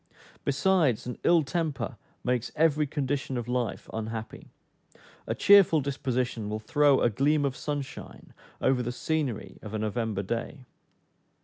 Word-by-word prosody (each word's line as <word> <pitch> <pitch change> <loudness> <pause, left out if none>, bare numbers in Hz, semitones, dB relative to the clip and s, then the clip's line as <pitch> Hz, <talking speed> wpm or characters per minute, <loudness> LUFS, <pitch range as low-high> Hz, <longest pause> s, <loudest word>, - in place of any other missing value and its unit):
Besides, 140 - +2
an 125 - -6
ill 170 -2 +5
temper 150 -4 -2 0.3
makes 125 -1 -1
every 155 -1 +3
condition 135 -2 -2
of 120 - -4
life 125 -3 -2
unhappy; 110 0 -5 0.8
a - - -1
cheerful 195 -5 +6
disposition 130 -5 -2
will 105 - -2
throw 145 +2 +3
a - - +4
gleam 145 +6 +2
of 135 -2 -1
sunshine 145 -2 -6 0.3
over 130 -1 +2
the 120 0 -2
scenery 125 -8 -3
of 110 0 -7
a - - 0
November 110 -1 -2
day. 120 +6 -4
130 Hz, 135 wpm, -28 LUFS, 115-150 Hz, 0.8 s, cheerful